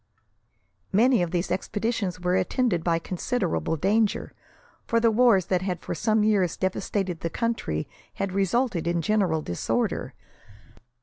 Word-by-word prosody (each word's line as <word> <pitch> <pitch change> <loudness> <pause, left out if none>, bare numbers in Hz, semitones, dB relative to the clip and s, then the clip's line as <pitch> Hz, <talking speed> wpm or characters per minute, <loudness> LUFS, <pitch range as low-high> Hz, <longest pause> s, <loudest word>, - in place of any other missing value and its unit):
Many 235 +2 +4
of 175 - 0
these 175 +1 -2
expeditions 205 -2 -2
were 180 0 0
attended 190 -1 +1
by 170 -1 +2
considerable 165 - -2
danger, 205 +6 +1 0.5
for 230 - +2
the 230 0 +3
wars 220 -5 +4
that 180 -1 0
had 185 -2 -2
for - - -5
some 215 -1 +1
years 200 -5 +2
devastated 190 -1 -2
the 165 - -3
country 225 - -2 0.3
had 195 - -2
resulted 195 -1 0
in 170 -1 0
general 180 -6 +1
disorder. 85 - -2
190 Hz, 135 wpm, -26 LUFS, 175-220 Hz, 0.5 s, Many